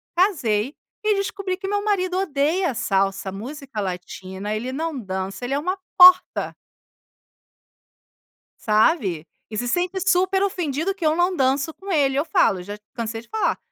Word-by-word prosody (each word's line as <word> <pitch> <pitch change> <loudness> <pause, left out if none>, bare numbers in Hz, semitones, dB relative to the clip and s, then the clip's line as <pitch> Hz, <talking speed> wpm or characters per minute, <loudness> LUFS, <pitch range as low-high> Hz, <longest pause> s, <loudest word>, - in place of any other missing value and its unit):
casei 275 - +1 0.3
e 425 -1 +3
descobri 395 -1 -2
que 385 0 -6
meu 410 +1 -1
marido 370 -3 0
odeia 325 -1 +1
salsa, 195 -4 0
música 255 +3 -6
Latina, 190 +2 -5
ele 240 +4 -3
não 315 +2 -3
dança, 190 -1 -5
ele 255 - -2
é 280 - +1
uma 365 +6 -2 0.2
porta. 365 0 +6 2.0
Sabe, 210 - +2 0.2
e 215 - -6
se 245 - -2
sente 360 +8 0
super 375 +1 +2
ofendido 350 -2 -1
que 380 -4 -6
eu 310 0 +3
não 355 +2 +2
danço 275 +1 +1
com 390 +1 -9
ele, 280 -6 +2
eu 285 - +1
falo 225 - +2
já 205 +3 -7 0.2
cansei 225 -2 -4
de 235 - -23
falar: 440 - 0
285 Hz, 155 wpm, -23 LUFS, -, 2.0 s, porta